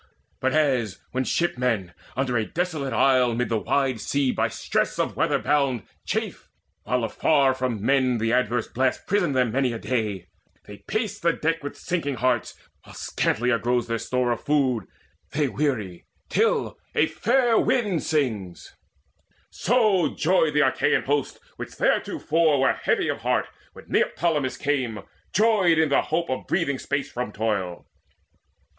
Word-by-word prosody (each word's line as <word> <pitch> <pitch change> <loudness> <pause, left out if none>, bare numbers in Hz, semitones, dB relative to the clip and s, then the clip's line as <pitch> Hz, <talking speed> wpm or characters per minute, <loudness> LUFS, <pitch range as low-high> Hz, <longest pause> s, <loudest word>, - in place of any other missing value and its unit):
But 130 0 0
as 130 -10 +1
when 130 +1 -1
shipmen, 125 - 0 0.2
under 130 -2 0
a 110 - +2
desolate 155 - -3
isle 130 -3 +3
Mid 120 -2 -1
the 115 -2 +1
wide 130 -2 0
sea 140 -2 +1
by - - 0
stress - - -1
of - - -1
weather - - +2
bound, 140 -6 +1 0.2
Chafe, - - -3 0.4
while 125 -1 0
afar 135 +4 +2
from 125 -5 -3
men 130 -2 +3
the 115 +1 0
adverse 120 -2 +1
blasts 130 +1 0
Prison 185 -7 +1
them 125 -3 +2
many 130 0 +1
a - - -3
day; 105 -7 -2 0.4
they 105 - -10
pace 215 -1 -2
the 170 0 +2
deck 165 +1 -1
With 145 - -6
sinking 160 -7 -2
hearts, 125 -2 0 0.3
while - - -14
scantier 120 +1 0
grows 120 0 0
their 115 -1 -2
store 125 0 0
Of 120 - -3
food; 130 -8 +1 0.5
they 145 0 +1
weary 120 - -2 0.2
till 455 +1 +1 0.2
a - - +4
fair 245 -4 +2
wind 210 -10 +1
sings; 110 - -2 0.8
So 215 -5 +2
joyed 160 -3 +2
the 150 - +5
Achaean - - +1
host, 145 0 -1 0.2
which - - -7
theretofore 160 -3 +1
Were 135 - +3
heavy - - 0
of - - -2
heart, - - 0 0.2
when - - -13
Neoptolemus 150 -5 0
came, 130 -7 -1 0.3
Joyed 200 -5 +3
in 160 -1 +3
the 140 - +3
hope 165 -1 -2
of 130 - -4
breathing 140 -7 0
space 140 -1 -3
from 125 -3 -4
toil. 100 -5 -2
130 Hz, 155 wpm, -24 LUFS, 120-155 Hz, 0.8 s, the